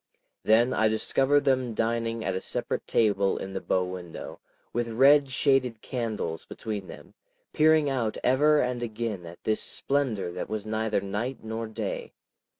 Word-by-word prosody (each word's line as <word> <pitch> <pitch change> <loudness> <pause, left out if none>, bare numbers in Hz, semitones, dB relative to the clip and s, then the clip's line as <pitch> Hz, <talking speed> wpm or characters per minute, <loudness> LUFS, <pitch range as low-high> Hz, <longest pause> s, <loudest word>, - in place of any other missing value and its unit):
Then 115 +4 +4
I 110 - +3
discovered 135 +6 +2
them 130 -4 +1
dining 115 0 -1
at 95 - 0
a 95 - -2
separate - - -3
table 100 -3 +2
in 95 - -6
the 95 - -3
bow 90 - +1
window, 90 -2 -7 0.3
with 120 0 0
red 135 +5 +5
shaded 130 -3 +2
candles 110 -10 -3
between 105 -4 -6
them, - - -12 0.4
peering 155 -1 +4
out 125 -6 -1
ever 150 +4 +4
and 125 -1 -1
again 110 -6 -4
at 85 +1 -12
this 110 0 0
splendor 120 -11 -1
that 90 - -5
was 110 -1 -3
neither 110 -1 0
night 110 +6 -4
nor 110 +1 -4
day. 110 -2 -5
115 Hz, 155 wpm, -27 LUFS, 105-130 Hz, 0.4 s, red